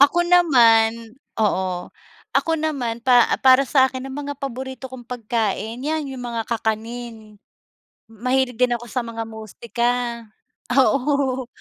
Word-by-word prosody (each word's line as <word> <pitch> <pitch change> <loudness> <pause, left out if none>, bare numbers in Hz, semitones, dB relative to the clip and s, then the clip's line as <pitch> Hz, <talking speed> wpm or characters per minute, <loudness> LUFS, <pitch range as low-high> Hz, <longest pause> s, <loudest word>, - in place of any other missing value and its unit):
Ako 285 +5 +5
naman 230 -9 +4 0.2
oo. 185 -4 -1 0.4
Ako 330 - +2
naman 265 -7 -2
pa 245 -2 +5
para 260 +1 +6
sa'kin 260 -1 +2
ang 270 +1 -7
mga 285 - -4
paborito 265 -1 -6
kong 245 -2 -10
pagkain 225 -1 -2
yan 305 0 -2
yung 250 -2 -7
mga 235 -1 -3
kakanin. 225 -1 -4 0.7
Mahilig 250 +2 -1
din 245 -1 +3
ako 240 +1 -11
sa 250 - -1
mga 230 0 -5
musika. 235 +2 -2 0.8
Oo. 270 -1 +2
245 Hz, 125 wpm, -22 LUFS, 225-265 Hz, 0.8 s, para